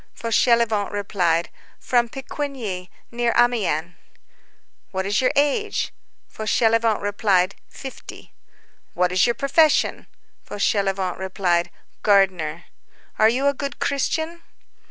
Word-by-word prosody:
Fauchelevent 230 Hz, -2 st, +2 dB
replied:— 180 Hz, -5 st, 0 dB, 0.3 s
"From 240 Hz, -2 st, +1 dB
Picquigny, 255 Hz, -, -5 dB, 0.2 s
near 240 Hz, 0 st, 0 dB
Amiens." 195 Hz, -9 st, +1 dB, 1.0 s
"What 190 Hz, -1 st, -3 dB
is 200 Hz, +3 st, +1 dB
your 255 Hz, -, +2 dB
age?" 295 Hz, +10 st, 0 dB, 0.3 s
Fauchelevent 225 Hz, 0 st, +1 dB
replied:— 200 Hz, -2 st, +1 dB, 0.2 s
"Fifty." 265 Hz, -1 st, -10 dB, 0.6 s
"What 180 Hz, 0 st, +1 dB
is 185 Hz, +5 st, +3 dB
your 235 Hz, -, +1 dB
profession?" 290 Hz, +4 st, +2 dB, 0.4 s
Fauchelevent 195 Hz, -3 st, -1 dB
replied:— 180 Hz, -2 st, 0 dB, 0.3 s
"Gardener." 180 Hz, -6 st, +2 dB, 0.6 s
"Are 220 Hz, -, +6 dB
you 255 Hz, +4 st, 0 dB
a 280 Hz, -, +3 dB
good 280 Hz, 0 st, -5 dB
Christian?" 320 Hz, +4 st, -1 dB
215 Hz, 100 wpm, -22 LUFS, 190-255 Hz, 1.0 s, Are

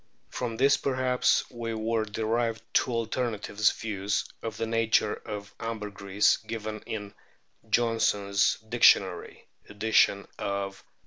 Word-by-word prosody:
From 115 Hz, -3 st, -3 dB
this 140 Hz, +3 st, +4 dB
perhaps 130 Hz, -2 st, +1 dB
were 115 Hz, -1 st, -2 dB
derived 115 Hz, +2 st, -1 dB
two -, -, +3 dB
alternative 115 Hz, -3 st, -3 dB, 0.2 s
views 100 Hz, -2 st, -2 dB, 0.2 s
of 115 Hz, -2 st, -5 dB
the 115 Hz, -, -1 dB
nature 115 Hz, -1 st, +2 dB
of 105 Hz, -1 st, -7 dB
ambergris 105 Hz, -3 st, 0 dB
given 110 Hz, -1 st, -6 dB
in 105 Hz, -2 st, -5 dB, 0.6 s
Johnsons 105 Hz, -4 st, +2 dB
Dictionary -, -, +3 dB, 0.2 s
(edition 105 Hz, -1 st, +3 dB, 0.2 s
of 100 Hz, -1 st, -3 dB
1818). -, -, -30 dB
110 Hz, 110 wpm, -28 LUFS, 105-115 Hz, 0.6 s, this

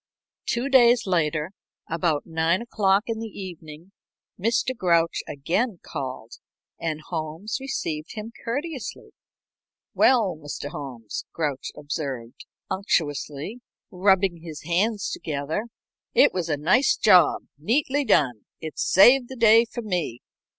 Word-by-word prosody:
Two 240 Hz, +2 st, 0 dB
days 245 Hz, -3 st, +5 dB
later, 165 Hz, -3 st, 0 dB, 0.4 s
about 160 Hz, -3 st, 0 dB
nine 165 Hz, +4 st, +1 dB
o'clock 200 Hz, -3 st, +2 dB
in 225 Hz, -1 st, -3 dB
the 225 Hz, -, -4 dB
evening, 170 Hz, -4 st, -10 dB, 0.5 s
Mr. 230 Hz, +5 st, +1 dB
Grouch 170 Hz, -5 st, +2 dB
again 180 Hz, -, -1 dB
called, 130 Hz, -4 st, -6 dB, 0.4 s
and 155 Hz, -2 st, -3 dB
Holmes 165 Hz, -, -4 dB
received 160 Hz, -, -4 dB
him 220 Hz, +1 st, -6 dB
courteously. 275 Hz, 0 st, -5 dB, 0.8 s
"Well, 225 Hz, -9 st, +4 dB
Mr. 145 Hz, 0 st, -6 dB
Holmes," 125 Hz, -8 st, -6 dB
Grouch 150 Hz, -5 st, -2 dB
observed, 140 Hz, -5 st, -5 dB, 0.2 s
unctuously, 155 Hz, -, -2 dB, 0.3 s
rubbing 190 Hz, -1 st, +2 dB
his 160 Hz, -2 st, -9 dB
hands 195 Hz, +6 st, 0 dB
together, 155 Hz, +8 st, -3 dB, 0.5 s
"it -, -, +6 dB
was 175 Hz, -3 st, -2 dB
a 150 Hz, -, +1 dB
nice 185 Hz, -, +3 dB
job, 180 Hz, -7 st, +5 dB, 0.2 s
neatly 270 Hz, -, +1 dB
done. 130 Hz, -, +2 dB
It 160 Hz, -1 st, -7 dB
saved 245 Hz, +6 st, +6 dB
the 260 Hz, -, -7 dB
day 230 Hz, -1 st, +6 dB
for 240 Hz, 0 st, -7 dB
me. 175 Hz, -, -2 dB
180 Hz, 120 wpm, -25 LUFS, 150-225 Hz, 0.8 s, it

